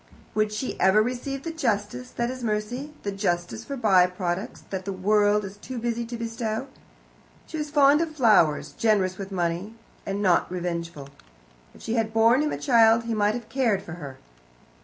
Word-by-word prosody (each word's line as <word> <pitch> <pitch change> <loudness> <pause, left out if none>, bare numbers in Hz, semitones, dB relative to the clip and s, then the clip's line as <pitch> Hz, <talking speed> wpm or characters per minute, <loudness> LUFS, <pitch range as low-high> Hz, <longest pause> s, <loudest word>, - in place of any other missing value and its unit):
Would 215 0 +1
she 210 +5 -4
ever 190 +3 +5
receive 255 +4 -2
the 330 - -4
justice 240 -3 -2
that 240 0 -2
is 255 -1 -7
mercy 230 +6 -2
the 200 - -2
justice 195 +1 -2
for 280 +2 -6
by 190 -7 +5
products 180 +1 -4
that 190 -1 -3
the 200 - -4
world 205 +2 +2
is 195 +1 -9
too 250 +4 -7
busy 235 0 -2
to 235 +1 -6
bestow? 230 +1 -3 0.8
She 320 - -6
was 300 0 -3
fond 290 +1 +5
of 320 -2 -3
flowers, 210 - +3
generous 200 -4 +1
with 195 0 -6
money, 180 +4 -2 0.3
and 195 0 -3
not 180 -3 +2
revengeful. 170 -5 -4 0.7
If - - -15
she 225 - -2
had 225 -2 0
borne 230 +4 +5
him 300 0 0
a - - -3
child 230 -3 +4
he 230 0 -3
might 210 0 +2
have 240 -2 -6
cared 230 -4 0
for 170 - -8
her. 135 -2 -8
215 Hz, 185 wpm, -25 LUFS, 190-240 Hz, 0.8 s, ever